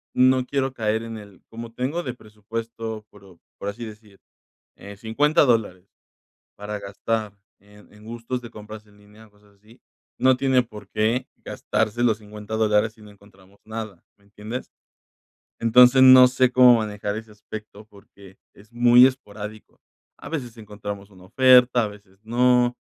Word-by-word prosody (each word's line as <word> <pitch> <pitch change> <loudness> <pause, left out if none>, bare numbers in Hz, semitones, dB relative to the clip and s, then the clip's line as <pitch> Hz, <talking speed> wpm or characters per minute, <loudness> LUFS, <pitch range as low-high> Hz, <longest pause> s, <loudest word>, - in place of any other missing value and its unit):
no 130 0 +3
quiero 135 0 -2
caer 110 -1 -1
en 115 -1 -7
el: 100 -3 -14
"Como 115 0 -9
tengo 140 +9 -3
de 125 - -5
presupuesto" 110 0 -7
pero, 95 -4 -18 0.2
por 100 - -5
así 105 +4 -8
decir, 105 -2 -14 0.6
eh, 100 0 -12
$50 145 +9 +2
dólares, 105 -7 0 0.7
para 105 +1 -6
gastar 105 +1 -4 0.3
en 105 +1 -20
en 105 - -18
gustos 120 +2 -5
de 120 - -10
compras 105 -1 -12
en 105 - -23
línea 105 +2 -19
o 105 - -29
cosas 105 0 -26
así, 110 +5 -22 0.4
no 130 -1 +4
tiene 130 -2 +2
por 110 -3 -13
qué 115 +4 -1 0.2
gastarse 110 +3 -2
los 110 -3 +2
$50 105 0 -8
dólares 110 0 +1
si 110 - -21
no 105 - -14
encontramos 100 -1 -22
nada, 110 -5 -8
¿me 100 - -31
entiendes? 105 +5 -8 0.9
Entonces, 125 +3 +6
no 130 -1 +9
sé 130 0 +2
cómo 125 -1 +7
manejar 105 -1 -4
ese 110 0 -9
aspecto 105 0 -11
porque 100 -2 -18 0.2
es 105 +3 -20
muy 120 +1 +6
esporádico, 110 -4 -7 0.4
a - - -10
veces 125 -7 -6
encontramos 105 -1 -8
una 90 -2 -18
oferta, 125 +1 +5
a - - -3
veces 100 -2 -17
no, 125 +1 +2
110 Hz, 160 wpm, -23 LUFS, 105-120 Hz, 0.9 s, no